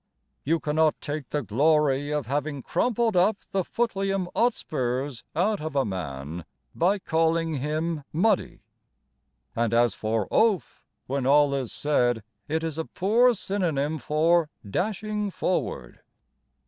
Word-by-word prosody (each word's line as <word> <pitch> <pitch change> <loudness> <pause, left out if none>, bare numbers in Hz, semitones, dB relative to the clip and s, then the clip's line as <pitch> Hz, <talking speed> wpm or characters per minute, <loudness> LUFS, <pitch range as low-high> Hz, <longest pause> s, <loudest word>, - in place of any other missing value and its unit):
You 165 +3 +1
cannot 155 +1 +1
take 145 -2 -5
the 150 -2 -1
glory 145 +4 +2
of 150 -2 -1
having 145 0 -2
crumpled 235 -3 +1
up 195 +4 +4
the 190 -1 +1
Footleum 195 -4 -1
Otspurs 135 - -1
out 200 +4 +1
of 155 -1 -5
a 135 - +2
man 80 -4 -5 0.3
By 185 +5 +2
calling 165 -3 +1
him 155 +2 -2
Muddy; 195 +5 +1 0.9
And 115 -1 +1
as 120 -3 +4
for 110 -1 -1
Oaf, 205 - +1 0.2
When 135 -1 -1
all 145 0 +5
is 135 -4 -2
said 120 -6 +1 0.2
It 160 +2 -1
is 160 -1 -3
a 160 - -2
poor 235 +6 +3
synonym 160 -7 -1
for 155 +4 +2 0.2
"dashing 210 - -2
forward." 180 - -2
155 Hz, 130 wpm, -26 LUFS, 135-185 Hz, 0.9 s, all